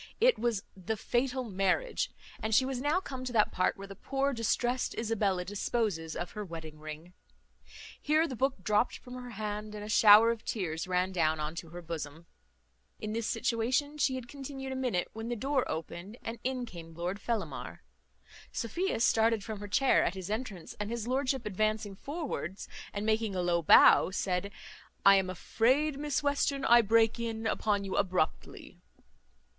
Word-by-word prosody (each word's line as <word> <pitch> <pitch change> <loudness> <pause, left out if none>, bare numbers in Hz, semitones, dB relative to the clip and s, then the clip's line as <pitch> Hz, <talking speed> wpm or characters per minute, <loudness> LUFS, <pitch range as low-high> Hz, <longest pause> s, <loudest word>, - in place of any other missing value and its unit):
It - - +4
was 230 -4 0
the 195 +4 -3
Fatal 255 +4 0
Marriage; 210 - 0 0.3
and 220 0 +1
she 260 - +5
was 260 -1 -3
now 295 +6 +2
come 260 -8 -7
to 255 -1 -4
that 215 -2 +3
part 185 - +1
where 195 - -8
the 195 - -9
poor 275 +6 -1
distrest 240 +2 0
Isabella 205 -5 0
disposes 200 -5 -2
of 175 - -4
her 210 - -5
wedding 160 -4 -8
ring. 155 +3 -9 0.9
Here 310 +2 +3
the 265 - -5
book 265 -5 -1
dropt 210 +5 +2
from 250 - -12
her 250 -1 -7
hand, 210 -1 -5
and 205 - -6
a 210 - -7
shower 220 +1 +8
of 230 -1 -5
tears 175 -5 -3
ran 185 +1 +1
down 160 -3 +1
into 160 +2 -4
her 175 +1 -9
bosom. 160 -1 -6 0.7
In 215 0 -4
this 230 0 -2
situation 250 +6 0
she 265 -2 +2
had 255 -2 -6
continued 270 0 -7
a - - -3
minute, 250 -9 0
when 225 +1 -5
the 240 - -1
door 265 +3 0
opened, 175 +6 -5
and 230 +1 -5
in 255 -1 -1
came 165 -6 -10
Lord 180 +4 -3
Fellamar. 210 -9 -4 0.7
Sophia 265 - -2
started 225 -2 +3
from 215 -1 -6
her 205 - -6
chair 260 +7 +3
at 185 - -1
his 190 +1 -6
entrance; 215 -6 -4
and 210 0 -3
his 235 -1 -3
lordship 260 -1 0
advancing 215 0 -1
forwards, 275 - -5 0.2
and 205 +1 -4
making 220 -2 +1
a 180 - 0
low 175 -1 +2
bow, 165 - +7
said, 185 +1 -2 0.5
"I 195 0 +9
am 190 -1 0
afraid, 265 - +1
Miss 295 0 -1
Western, 285 -1 +1
I 240 0 +7
break 225 +1 +3
in 225 -1 -3
upon 210 -2 +1
you 195 - -4
abruptly." 180 -3 -2
220 Hz, 175 wpm, -31 LUFS, 190-255 Hz, 0.9 s, I